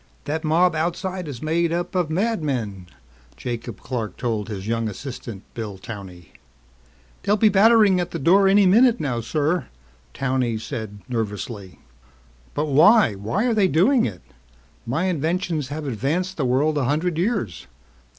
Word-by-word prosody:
That 155 +2 -2
mob 170 +3 +3
outside 175 +2 -2
is 135 -3 -7
made 165 +2 +1
up 175 +3 -2
of 180 -4 0
madmen," 145 - -2 0.5
Jacob 120 -3 -6
Clark 115 -7 -4
told 110 -4 -2
his 100 -1 -6
young 115 -1 -1
assistant, 115 -2 -8
Bill 105 -4 -6
Towney. 95 -5 -10 0.9
"They'll 205 +2 +2
be 215 +1 +5
battering 205 -1 +5
at 175 -1 -2
the 170 - -4
door 190 +6 +4
any 200 +1 +5
minute 230 +6 +5
now, 125 -6 -2
sir," 155 +8 -1 0.5
Towney 130 -4 0
said 110 -2 -6
nervously. 105 -4 -4 0.8
"But 150 - 0
why? 160 - +5
Why 110 - -2
are 245 - +2
they 205 -3 +3
doing 190 - +3
it? 95 -5 -8 0.6
My 140 +9 0
inventions 170 -3 -1
have 150 +2 -5
advanced 150 - -2
the 145 - -1
world 145 +5 +2
a 135 - 0
hundred 160 +5 0
years. 195 - -2
150 Hz, 150 wpm, -23 LUFS, 115-180 Hz, 0.9 s, be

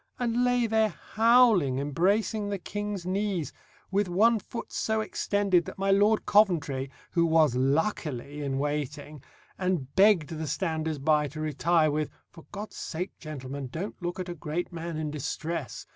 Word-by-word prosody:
and 240 0 0
lay 245 -1 +2
there 220 -1 +1 0.2
howling, 225 - +5
embracing 200 +9 +1
the 200 - -1
King's 205 0 -5
knees, 190 -3 -1 0.4
with 200 -1 +1
one 220 +6 +4
foot 230 +4 -8
so 220 0 0
extended 200 -4 +1
that - - -8
my 195 0 +1
Lord 205 +2 +3
Coventry, 150 -10 +2 0.2
who 170 - +2
was 160 -5 +4
luckily 145 - -1
in 135 -2 -2
waiting, 145 0 -3 0.4
and 180 -8 -1
begged 195 -6 +5
the 160 -2 -4
standers 160 0 -2
by 150 +1 +2
to 150 +3 -9
retire, 155 +1 +2
with, 150 0 -1 0.2
"For 165 - -15
God's 210 +1 -7
sake, 180 +4 -4
gentlemen, 140 -3 -6
don't 180 - -6
look 175 +1 -3
at 185 - -4
a 175 - -4
great 170 +2 -4
man 165 -1 -5
in 155 -1 -3
distress!" 155 -2 -4
170 Hz, 160 wpm, -28 LUFS, 150-205 Hz, 0.4 s, howling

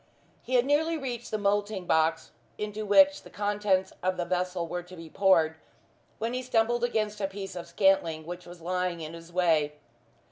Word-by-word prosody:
He 255 - -2
had 245 0 +4
nearly 320 +4 +2
reached 245 -5 -5
the 215 - -1
moulding 205 -1 0
box 160 0 +1 0.3
into 210 0 -4
which 290 +7 +6
the - - -14
contents 205 -2 0
of 185 0 0
the 175 - -1
vessel 180 0 -1
were 175 +2 -3
to 180 +1 -13
be 165 -2 -11
poured, 165 -5 +3 0.6
when 230 +2 -2
he 255 - -1
stumbled 240 -1 +1
against 215 -3 -1
a 195 - +1
piece 195 -1 -7
of 170 -1 -6
scantling 170 -3 +2
which 175 +1 -7
was 175 -1 -11
lying 180 0 -2
in 155 +1 -6
his 165 +1 -11
way. 160 -4 +2
190 Hz, 185 wpm, -28 LUFS, 170-215 Hz, 0.6 s, which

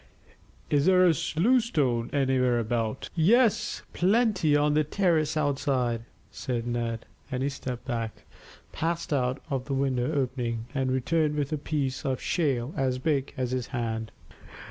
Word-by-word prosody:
"Is 145 +1 +3
there 185 -1 +6
a 170 - +5 0.2
loose 235 +8 +4
stone 125 - 0
anywhere 130 -3 +2
about?" 115 +1 -2
"Yes, 215 +7 +3
plenty 190 -5 +3
on 145 0 +3
the 155 +1 +3
terrace 155 -2 +1
outside," 135 -5 0 0.3
said 120 -2 -3
Ned, 120 -1 -2 0.3
and 130 0 -1
he 140 - +1
stepped 130 -3 -6
back, 115 -4 -4 0.5
passed 165 -1 -2
out 130 -1 0
of 130 -2 -1
the 140 - -2
window 135 0 0
opening, 125 -5 -2
and 135 -2 0
returned 150 +4 +1
with 145 0 -1
a - - 0
piece 145 -2 -2
of 130 -2 -1
shale 140 -6 0
as 130 -1 0
big 140 0 0
as 125 -1 -1
his 130 -2 -2
hand. 110 -2 -3
135 Hz, 150 wpm, -27 LUFS, 125-155 Hz, 0.5 s, there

